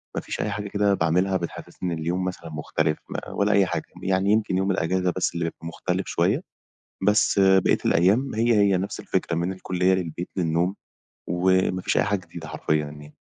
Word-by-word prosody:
مافيش -, -, -3 dB
أي 105 Hz, -, -1 dB
حاجة 105 Hz, 0 st, -4 dB
كده 100 Hz, 0 st, +2 dB
باعملها 90 Hz, +3 st, +2 dB
بتحسسني 85 Hz, +1 st, -5 dB
إن 80 Hz, -, -4 dB
اليوم 90 Hz, +3 st, -1 dB
مثلًا 85 Hz, -3 st, -5 dB
مختلف، 75 Hz, 0 st, -1 dB
م -, -, -7 dB, 0.2 s
ولا 100 Hz, +1 st, +2 dB
أي 100 Hz, -1 st, +5 dB
حاجة، -, -, -2 dB, 0.2 s
يعني 95 Hz, +1 st, +2 dB
يمكن 105 Hz, -4 st, +2 dB
يوم 95 Hz, +1 st, +1 dB
الإجازة 90 Hz, 0 st, 0 dB
بس -, -, 0 dB
اللي 85 Hz, -1 st, -2 dB
بيبقى 85 Hz, 0 st, -6 dB
مختلف 85 Hz, -, -3 dB
شوية، -, -, +1 dB, 0.6 s
بس 105 Hz, 0 st, +3 dB
باقية 95 Hz, -1 st, +5 dB
الأيام 105 Hz, +11 st, +3 dB
هي، 115 Hz, +1 st, +3 dB
هي 100 Hz, -2 st, +4 dB
نفس 95 Hz, +2 st, -3 dB
الفكرة، 85 Hz, -, -1 dB
من 85 Hz, +3 st, -1 dB
الكُلّية 95 Hz, 0 st, +1 dB
للبيت، 90 Hz, -1 st, -4 dB
للنوم، 85 Hz, +2 st, 0 dB, 0.5 s
وما 95 Hz, +1 st, +2 dB
فيش -, -, 0 dB
أي -, -, +3 dB
حاجة 100 Hz, -1 st, 0 dB
جديدة 80 Hz, -2 st, -9 dB
حرفيًا 75 Hz, -, 0 dB
يعني. 75 Hz, 0 st, -11 dB
95 Hz, 185 wpm, -24 LUFS, 85-100 Hz, 0.6 s, أي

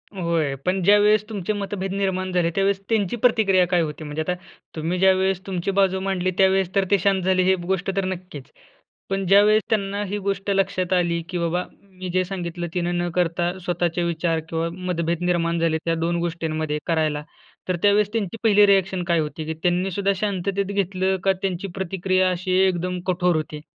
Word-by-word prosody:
होय. 165 Hz, -6 st, 0 dB
पण 185 Hz, +1 st, +1 dB
ज्यावेळेस 210 Hz, +2 st, +5 dB
तुमचे 210 Hz, -1 st, -2 dB
मतभेद 195 Hz, -1 st, -4 dB
निर्माण 185 Hz, -1 st, -1 dB
झाले, 175 Hz, -2 st, +1 dB
त्यावेळेस 195 Hz, 0 st, +1 dB
त्यांची 215 Hz, -1 st, +1 dB
प्रतिक्रिया 210 Hz, -6 st, +3 dB
काय 175 Hz, -1 st, +2 dB
होती? 155 Hz, 0 st, -4 dB
म्हणजे 150 Hz, +1 st, -4 dB
आता 180 Hz, -, +1 dB, 0.4 s
तुम्ही 165 Hz, +3 st, -2 dB
ज्यावेळेस 190 Hz, 0 st, +2 dB
तुमची 185 Hz, 0 st, -2 dB
बाजू 190 Hz, -1 st, +2 dB
मांडली. 185 Hz, -1 st, -1 dB
त्यावेळेस 190 Hz, -1 st, +3 dB
तर 195 Hz, -1 st, +3 dB
ते 200 Hz, -, +6 dB
शांत 195 Hz, 0 st, +2 dB
झाले 185 Hz, 0 st, +2 dB
हे 190 Hz, +1 st, +4 dB
गोष्ट 190 Hz, +1 st, -1 dB
तर 195 Hz, -, +1 dB
नक्कीच. 180 Hz, -6 st, -6 dB, 0.7 s
पण 195 Hz, 0 st, -1 dB
ज्यावेळेस 210 Hz, +2 st, +5 dB
त्यांना 200 Hz, -1 st, 0 dB
ही 205 Hz, +2 st, -3 dB
गोष्ट 195 Hz, 0 st, -3 dB
लक्षात 185 Hz, -2 st, 0 dB
आली, 170 Hz, -2 st, +1 dB
की 180 Hz, -, -3 dB
बाबा 170 Hz, +1 st, 0 dB, 0.2 s
मी 185 Hz, -2 st, -9 dB
जे 185 Hz, +1 st, +1 dB
सांगितलं. 175 Hz, -2 st, -4 dB
तिनं 175 Hz, 0 st, -1 dB
न 175 Hz, 0 st, -1 dB
करता 175 Hz, 0 st, +1 dB
स्वतःचे 175 Hz, -1 st, -1 dB
विचार 165 Hz, -1 st, 0 dB
किंवा 165 Hz, 0 st, -1 dB
मतभेद 170 Hz, -1 st, -2 dB
निर्माण 170 Hz, -1 st, +1 dB
झाले 165 Hz, -1 st, +1 dB
त्या 165 Hz, 0 st, +1 dB
दोन 165 Hz, +1 st, -1 dB
गोष्टींमध्ये 160 Hz, -3 st, -2 dB
करायला, 155 Hz, -3 st, 0 dB, 0.4 s
तर 185 Hz, -, 0 dB
त्यावेळेस 205 Hz, 0 st, +4 dB
त्यांची 220 Hz, -1 st, -2 dB
पहिली 210 Hz, -2 st, +6 dB
रिएक्शन 190 Hz, -2 st, +2 dB
काय 170 Hz, -1 st, +2 dB
होती, 155 Hz, 0 st, -4 dB
की 160 Hz, -, -3 dB
त्यांनीसुद्धा 185 Hz, +2 st, +1 dB
शांततेत 200 Hz, 0 st, -1 dB
घेतलं 190 Hz, -1 st, 0 dB
का 195 Hz, 0 st, +3 dB
त्यांची 190 Hz, 0 st, -2 dB
प्रतिक्रिया 185 Hz, 0 st, 0 dB
अशी 185 Hz, +1 st, -3 dB, 0.2 s
एकदम 180 Hz, 0 st, -2 dB
कठोर 180 Hz, -1 st, +2 dB
होती? 155 Hz, -1 st, -4 dB
185 Hz, 180 wpm, -23 LUFS, 170-195 Hz, 0.7 s, ते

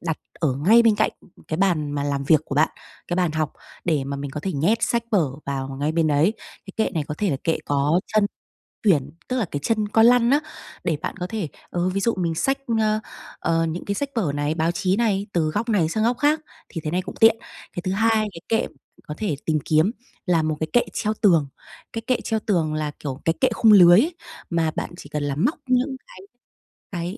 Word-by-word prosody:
đặt 165 Hz, -2 st, -3 dB, 0.2 s
ở 150 Hz, -6 st, +1 dB
ngay 200 Hz, -, +5 dB
bên 225 Hz, -2 st, +5 dB
cạnh 215 Hz, -, +2 dB, 0.4 s
cái 155 Hz, -, -1 dB
bàn 170 Hz, -6 st, +1 dB
mà 145 Hz, -1 st, -2 dB
làm 140 Hz, -1 st, -1 dB
việc 155 Hz, +1 st, +5 dB
của 140 Hz, -, -5 dB
bạn, 155 Hz, +3 st, +4 dB, 0.4 s
cái 175 Hz, -, -1 dB
bàn 180 Hz, -3 st, +1 dB
học 155 Hz, -1 st, -1 dB, 0.3 s
để 155 Hz, -6 st, +1 dB
mà 140 Hz, +1 st, -4 dB
mình 140 Hz, 0 st, -5 dB
có 150 Hz, -, -5 dB
thể 190 Hz, +4 st, -3 dB
nhét 170 Hz, +11 st, +2 dB
sách 235 Hz, -1 st, +1 dB
vở 180 Hz, -9 st, +3 dB, 0.2 s
vào 135 Hz, -1 st, -3 dB
ngay 150 Hz, +2 st, 0 dB
bên 165 Hz, -1 st, +2 dB
đấy. 150 Hz, +6 st, +3 dB
Cái 195 Hz, -, -14 dB
kệ 220 Hz, -, +1 dB
này 155 Hz, -3 st, 0 dB
có 150 Hz, -, -3 dB
thể 205 Hz, -3 st, +1 dB
là 140 Hz, -, 0 dB
kệ 165 Hz, -, +1 dB
có 145 Hz, +4 st, +2 dB
chân 215 Hz, -1 st, +4 dB, 0.6 s
tuyển, 150 Hz, -10 st, +3 dB, 0.2 s
tức 255 Hz, -, -1 dB
là 235 Hz, -, +1 dB
cái 145 Hz, -, -2 dB
chân 215 Hz, +1 st, +1 dB
con 225 Hz, +2 st, +4 dB
lăn 240 Hz, 0 st, +5 dB
á, 290 Hz, -, +5 dB, 0.4 s
để 160 Hz, -, 0 dB
bạn -, -, -4 dB
có 180 Hz, -1 st, -3 dB
thể 210 Hz, -4 st, -3 dB, 0.2 s
ừ, 175 Hz, +1 st, 0 dB
ví 190 Hz, +2 st, -1 dB
dụ 230 Hz, +3 st, +2 dB
mình 170 Hz, -3 st, -1 dB
xách, 270 Hz, +11 st, +1 dB, 0.2 s
ờ, 215 Hz, 0 st, +2 dB, 0.4 s
ờ 165 Hz, 0 st, +1 dB
những 165 Hz, +2 st, -4 dB
cái 200 Hz, -, -2 dB
sách 280 Hz, +6 st, -2 dB
vở 185 Hz, -11 st, +1 dB
này, 145 Hz, +1 st, 0 dB
báo 165 Hz, +1 st, +1 dB
chí 185 Hz, +1 st, 0 dB
này, 205 Hz, -3 st, 0 dB
từ 160 Hz, -3 st, +1 dB
góc 210 Hz, +9 st, -2 dB
này 185 Hz, -8 st, +2 dB
sang 215 Hz, +5 st, 0 dB
góc 240 Hz, +2 st, +2 dB
khác, 295 Hz, +3 st, +3 dB, 0.3 s
thì 165 Hz, -, -6 dB
thế 155 Hz, -, -2 dB
này 180 Hz, +2 st, 0 dB
cũng -, -, -8 dB
tiện. 225 Hz, 0 st, +7 dB, 0.4 s
Cái 175 Hz, -, -4 dB
thứ 185 Hz, -, -1 dB
hai 225 Hz, +4 st, +2 dB, 0.2 s
cái 165 Hz, -, -10 dB
kệ 225 Hz, -, +1 dB, 0.4 s
có 150 Hz, -, -4 dB
thể 200 Hz, -9 st, -1 dB
tìm 155 Hz, -1 st, +1 dB
kiếm 160 Hz, +6 st, +3 dB, 0.3 s
là 170 Hz, -4 st, +2 dB
một 155 Hz, 0 st, 0 dB
cái 160 Hz, -, -1 dB
kệ 240 Hz, -, +6 dB
treo 215 Hz, 0 st, -1 dB
tường. 170 Hz, -9 st, +4 dB, 0.5 s
Cái 225 Hz, -, -3 dB
kệ 255 Hz, -2 st, +1 dB
treo 220 Hz, -1 st, 0 dB
tường 170 Hz, -8 st, 0 dB
là, 155 Hz, -1 st, -2 dB
kiểu, 135 Hz, -1 st, -5 dB
cái 165 Hz, -, +3 dB
kệ 260 Hz, -, +5 dB
khung 225 Hz, -1 st, +5 dB
lưới 180 Hz, -2 st, +8 dB
ấy, 325 Hz, +8 st, 0 dB, 0.3 s
mà 165 Hz, -2 st, +1 dB
bạn -, -, -3 dB
chỉ -, -, -11 dB
cần 150 Hz, -1 st, -3 dB
là 145 Hz, -1 st, -1 dB
móc 180 Hz, -, +1 dB
những 255 Hz, +2 st, +1 dB
cái -, -, -14 dB, 0.7 s
cái 175 Hz, +2 st, -4 dB
175 Hz, 240 wpm, -23 LUFS, 155-215 Hz, 0.7 s, lưới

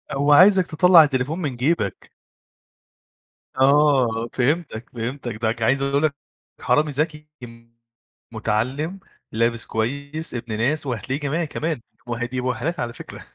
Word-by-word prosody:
هوعايزك 180 Hz, +7 st, +5 dB
تطلّع 170 Hz, +1 st, +6 dB
التليفون 140 Hz, +3 st, -1 dB
من 145 Hz, -6 st, -3 dB
جيبك. 120 Hz, -, -2 dB, 1.4 s
آه. 130 Hz, -4 st, +3 dB
فهمتك، 135 Hz, -3 st, -1 dB
فهمتك. 120 Hz, 0 st, -5 dB
ده 110 Hz, +1 st, -1 dB
ك 115 Hz, 0 st, -8 dB
عايز 135 Hz, +5 st, +2 dB
أقول 140 Hz, +2 st, 0 dB
لك 150 Hz, -3 st, +1 dB, 0.5 s
حرامي 150 Hz, 0 st, +2 dB
ذكي 150 Hz, +1 st, -2 dB, 0.2 s
ام 115 Hz, 0 st, -14 dB, 0.5 s
مُتعلِّم، 125 Hz, -, -2 dB, 0.3 s
لابس 115 Hz, +1 st, 0 dB
كويس، 140 Hz, +8 st, -2 dB
ابن 115 Hz, -2 st, -4 dB
ناس 145 Hz, +7 st, 0 dB
وهتلاقيه 130 Hz, +3 st, -3 dB
جامعي 155 Hz, +4 st, -1 dB
كمان 155 Hz, -2 st, -3 dB, 0.3 s
وه 120 Hz, 0 st, -3 dB
دي 125 Hz, +1 st, -4 dB
مؤهّلات 130 Hz, +7 st, -2 dB
على 120 Hz, -1 st, -3 dB
فكرة. -, -, -10 dB
135 Hz, 130 wpm, -22 LUFS, 115-150 Hz, 1.4 s, تطلّع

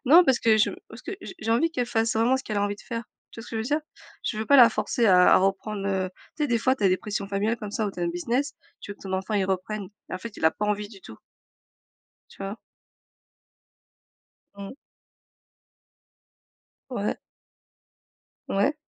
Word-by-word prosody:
Non 335 Hz, +7 st, +8 dB
parce 265 Hz, -4 st, +3 dB
que 220 Hz, -1 st, +5 dB
je 215 Hz, -, +3 dB, 0.2 s
parce 225 Hz, +3 st, -12 dB
que 390 Hz, -, -5 dB
j'ai -, -, -8 dB
j'ai 225 Hz, -, -3 dB
envie 325 Hz, +8 st, +2 dB
qu'elle 250 Hz, -6 st, -1 dB
fasse 225 Hz, 0 st, +1 dB
vraiment 230 Hz, +4 st, +3 dB
ce 265 Hz, -, -5 dB
qu'elle 215 Hz, -, -4 dB
a 200 Hz, -, +2 dB
envie 205 Hz, 0 st, 0 dB
de -, -, -15 dB
faire, 230 Hz, -1 st, -5 dB, 0.3 s
tu -, -, -9 dB
vois 230 Hz, -, -9 dB
ce -, -, -11 dB
que 225 Hz, -, -4 dB
je -, -, 0 dB
veux -, -, -1 dB, 0.2 s
dire? -, -, -12 dB, 0.4 s
Je 215 Hz, -, -1 dB
veux 220 Hz, -, -2 dB
pas 280 Hz, -, +6 dB
la 240 Hz, -3 st, +10 dB
forcer 230 Hz, +1 st, 0 dB
à 180 Hz, -2 st, +7 dB
à -, -, +8 dB
reprendre, 195 Hz, +1 st, -1 dB
heu, 190 Hz, -1 st, 0 dB, 0.3 s
tu 300 Hz, -, -2 dB
sais -, -, -1 dB
des 235 Hz, -1 st, +2 dB
fois 260 Hz, +3 st, +2 dB
tu 215 Hz, -, -8 dB
as -, -, +6 dB
des 185 Hz, -, +3 dB
pressions 200 Hz, -1 st, -4 dB
familiales 210 Hz, +4 st, 0 dB
comme 210 Hz, -2 st, -7 dB
ça 215 Hz, 0 st, -1 dB
où -, -, -2 dB
tu -, -, -8 dB
as -, -, 0 dB
un 170 Hz, -, +1 dB
business, 235 Hz, -, -1 dB, 0.3 s
tu -, -, -9 dB
veux 200 Hz, -, -7 dB
que -, -, -18 dB
ton 190 Hz, -1 st, -6 dB
enfant 190 Hz, +3 st, -2 dB
il 195 Hz, -2 st, +2 dB
reprenne 190 Hz, +2 st, -2 dB, 0.2 s
et -, -, -3 dB
en 185 Hz, -, -4 dB
fait 230 Hz, +1 st, -8 dB
il -, -, -4 dB
a 160 Hz, -, +7 dB
pas 210 Hz, -, -4 dB
envie 210 Hz, 0 st, -1 dB
du 200 Hz, -3 st, -14 dB
tout 110 Hz, -, -11 dB, 1.1 s
tu 195 Hz, -, -10 dB
vois? 195 Hz, +2 st, -4 dB, 2.0 s
Mhm. 200 Hz, +4 st, -7 dB, 2.2 s
Ouais. 210 Hz, -5 st, -2 dB, 1.3 s
Ouais. 205 Hz, +10 st, +1 dB
210 Hz, 225 wpm, -26 LUFS, 195-235 Hz, 2.2 s, la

